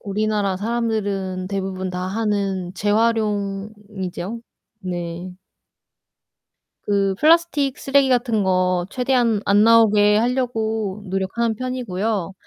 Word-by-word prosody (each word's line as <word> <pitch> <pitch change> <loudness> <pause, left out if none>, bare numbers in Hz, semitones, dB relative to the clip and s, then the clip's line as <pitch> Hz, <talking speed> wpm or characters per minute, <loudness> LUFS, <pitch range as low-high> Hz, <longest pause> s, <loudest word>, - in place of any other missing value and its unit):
우리나라 205 -1 -1
사람들은 205 -4 -2
대부분 190 -1 -3
다 180 0 -4
하는 195 -3 -2
재활용이죠. 205 -1 -2 0.4
네. 175 0 -5 1.5
그 200 -1 +1
플라스틱 310 -4 +3
쓰레기 275 0 +2
같은 240 -4 +1
거 185 -1 +1
최대한 245 -4 +1
안 205 +1 +5
나오게 210 -2 +5
하려고 225 -4 -1
노력하는 195 +5 -1
편이고요. 220 -6 -3
210 Hz, 235 characters per minute, -21 LUFS, 190-230 Hz, 1.5 s, 안